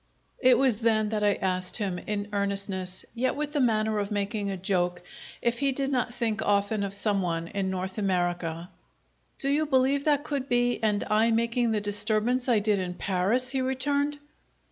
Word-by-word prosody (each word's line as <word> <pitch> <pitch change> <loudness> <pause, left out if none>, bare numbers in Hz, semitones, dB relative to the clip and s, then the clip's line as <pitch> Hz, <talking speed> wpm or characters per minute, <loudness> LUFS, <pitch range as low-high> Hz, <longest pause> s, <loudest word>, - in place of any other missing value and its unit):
It 255 -1 +5
was 260 -5 +3
then 220 -2 +2
that 210 -1 -1
I 205 -1 +3
asked 185 -1 0
him, 195 -5 -2
in 205 -1 -3
earnestness, 195 -2 -3
yet 250 +2 0
with 295 0 -3
the 295 - +1
manner 220 -4 +2
of 200 -1 -2
making 205 0 -2
a 195 - -3
joke, 180 -2 -1 0.4
if 235 0 +1
he 275 -1 +2
did 275 +1 -2
not 250 -2 0
think 225 -3 -1
often 205 0 +1
of 200 0 -2
some 200 -1 +1
one 165 -2 -2
in 195 -2 -2
North 190 +2 -3
America. 175 -3 -1 0.7
"Do 275 - +2
you 300 +2 +1
believe 270 0 +2
that 290 -2 +2
could 280 -3 -3
be, 245 0 +2
and 210 -2 +1
I 220 +2 +2
making 235 +1 +1
the 215 -2 0
disturbance 215 +5 0
I 235 - +4
did 205 -1 +1
in 180 -1 -4
Paris?" 205 +8 0
he 265 -1 0
returned. 285 +3 0
215 Hz, 190 wpm, -27 LUFS, 195-250 Hz, 0.7 s, It